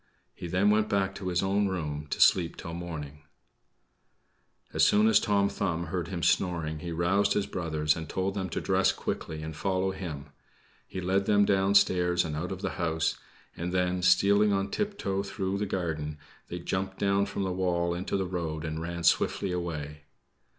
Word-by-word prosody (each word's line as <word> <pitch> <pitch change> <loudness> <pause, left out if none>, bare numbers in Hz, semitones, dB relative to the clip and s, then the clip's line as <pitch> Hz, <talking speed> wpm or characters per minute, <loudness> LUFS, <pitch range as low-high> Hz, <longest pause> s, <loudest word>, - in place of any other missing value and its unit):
He 90 - -7
then 95 +4 +3
went 110 0 +2
back 95 -1 +1
to 95 -1 -6
his 90 0 +1
own 100 +1 +2
room 75 -5 -3
to - - -3
sleep 85 -2 +4
till 85 - -7
morning. 75 -4 -6 1.5
As - - +3
soon 105 +1 +5
as 110 - +6
Tom 100 -1 +2
Thumb 85 -4 -2
heard 90 -3 -1
him 90 -4 -4
snoring, 80 -4 +1
he 85 +1 -5
roused 95 +5 +2
his 105 - 0
brothers, 80 -3 0
and 80 -2 -6
told 95 +1 -1
them 95 -2 -3
to - - -2
dress - - +3
quickly 80 -1 -4
and 80 0 -6
follow 95 +2 0
him. 75 -7 -6 0.6
He 95 - -5
led 95 +2 +1
them 100 -1 +5
downstairs 95 -3 +3
and 75 -2 -3
out 85 +5 -3
of 95 0 -6
the - - -1
house; 80 -1 0 0.4
and 85 +1 -4
then, 90 0 0
stealing 100 +3 +4
on 100 0 0
tiptoe 200 - -1
through 100 0 -3
the 105 - -1
garden, 80 -5 -3 0.3
they 90 - -5
jumped 95 +2 -3
down 100 0 +2
from 100 0 -3
the 95 - -1
wall 85 -2 0
into 90 +3 -2
the 95 - -1
road 85 -3 -3
and 80 0 -3
ran 85 0 -4
swiftly 95 +3 +2
away. 75 -4 -4
90 Hz, 185 wpm, -28 LUFS, 80-95 Hz, 1.5 s, as